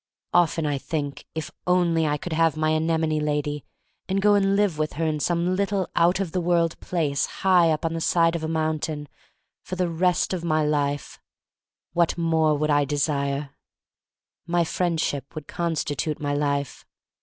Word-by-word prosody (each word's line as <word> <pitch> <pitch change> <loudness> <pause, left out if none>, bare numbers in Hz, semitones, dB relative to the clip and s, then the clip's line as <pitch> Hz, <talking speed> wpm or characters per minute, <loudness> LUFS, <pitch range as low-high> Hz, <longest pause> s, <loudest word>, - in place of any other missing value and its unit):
Often 170 -2 +3
I 145 -2 0
think, 145 -1 -4
if 160 -1 -4 0.2
only 170 -3 +3
I 150 0 0
could 170 +3 -5
have 165 -1 +2
my 155 0 +1
anemone 160 0 +1
lady 150 -1 -1 0.5
and 195 +1 +1
go 205 +1 +4
and 195 -1 +3
live 200 -6 +1
with 155 0 -1
her 165 +2 -2
in 155 -1 0
some 175 +3 +1
little 200 -1 0
out 175 +3 +3
of 190 -4 -2
the 180 - -1
world 170 -1 +1
place 150 -6 -1 0.2
high 180 -3 +5
up 155 0 0
on 165 - 0
the 165 - -3
side 165 0 +3
of 165 - -3
a - - -1
mountain 155 -2 -2 0.5
for 185 - -6
the 180 -1 0
rest 175 +2 +1
of 175 -2 -3
my 155 -2 +1
life 145 -1 -1 0.4
— - - -66
what 170 0 +2
more 160 -2 +2
would 150 +1 0
I 145 0 +4
desire? 140 0 -1 1.0
My 175 0 +2
friendship 160 -5 -2
would 155 -2 -6
constitute 155 -3 -2
my 145 -1 -1
life. 140 -1 -1
160 Hz, 180 wpm, -24 LUFS, 150-175 Hz, 1.0 s, high